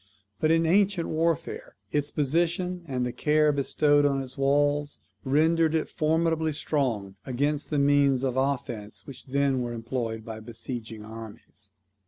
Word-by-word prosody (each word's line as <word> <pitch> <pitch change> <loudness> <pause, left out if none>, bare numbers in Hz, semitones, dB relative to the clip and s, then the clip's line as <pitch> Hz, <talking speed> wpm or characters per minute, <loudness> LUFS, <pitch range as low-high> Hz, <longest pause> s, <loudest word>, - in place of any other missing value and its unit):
But 155 - +2
in 165 0 +3
ancient 190 0 +2
warfare 300 - -1 0.2
its 145 -1 0
position, 170 +5 0
and 125 -3 -1
the 125 - -2
care 150 +3 +3
bestowed 145 +1 +2
on 140 -1 +2
its 130 -1 -6
walls, 145 +1 +1 0.3
rendered 160 +3 +3
it 160 - 0
formidably 160 0 +1
strong 115 -11 -2
against 145 +3 -1
the 150 - 0
means 140 -2 +3
of 130 -2 0
offence 125 -6 -2
which 140 -1 -10
then 135 -1 +1
were 120 -1 -3
employed 115 -1 -4
by 110 -1 -6
besieging 115 -1 -6
armies. 110 -1 -11
140 Hz, 145 wpm, -27 LUFS, 125-155 Hz, 0.3 s, in